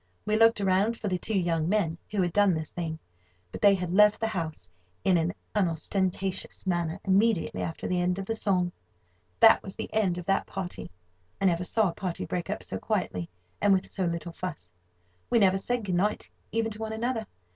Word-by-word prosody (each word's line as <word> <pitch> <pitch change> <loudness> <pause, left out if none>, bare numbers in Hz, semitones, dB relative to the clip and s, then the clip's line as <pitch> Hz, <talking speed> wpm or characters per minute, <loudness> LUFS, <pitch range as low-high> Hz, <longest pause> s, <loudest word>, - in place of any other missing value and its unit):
We 215 - +1
looked 225 0 +5
around 200 +4 +2
for 215 - -4
the 180 -1 -1
two 215 +3 -1
young 165 -3 +1
men 175 -6 +1
who 200 -3 +1
had 175 -1 -1
done 205 -4 +4
this 155 -1 -4
thing, 165 -2 -4 0.5
but - - -7
they 200 -1 +7
had 180 -2 -3
left 210 +2 +5
the 225 - 0
house 160 - -4 0.4
in 185 - +4
an 165 +1 +2 0.2
unostentatious 190 +1 -1
manner 175 -1 -1
immediately 200 0 +2
after 165 - -4
the 180 -1 +1
end 180 +1 +1
of 195 - -4
the 225 - -1
song. 185 -5 +1 0.7
That 225 -1 +8
was 190 - -8
the - - -6
end 195 -5 +1
of 175 - -6
that 195 - +1
party. 175 - -5 0.5
I 195 - 0
never 175 -1 +2
saw 210 +3 +2
a - - -6
party 185 -3 -4
break 180 0 -3
up 205 - -3
so - - -4
quietly, 180 - -2 0.3
and 205 - +5
with 190 0 0
so 190 - -2
little 170 0 -3
fuss. 165 - -6 0.6
We - - +3
never 195 -3 +4
said 245 +2 -2
good 185 - -2
night 200 +4 0 0.2
even 225 +1 0
to 215 - -9
one 220 0 -3
another. 225 -1 -2
190 Hz, 205 wpm, -28 LUFS, 175-210 Hz, 0.7 s, That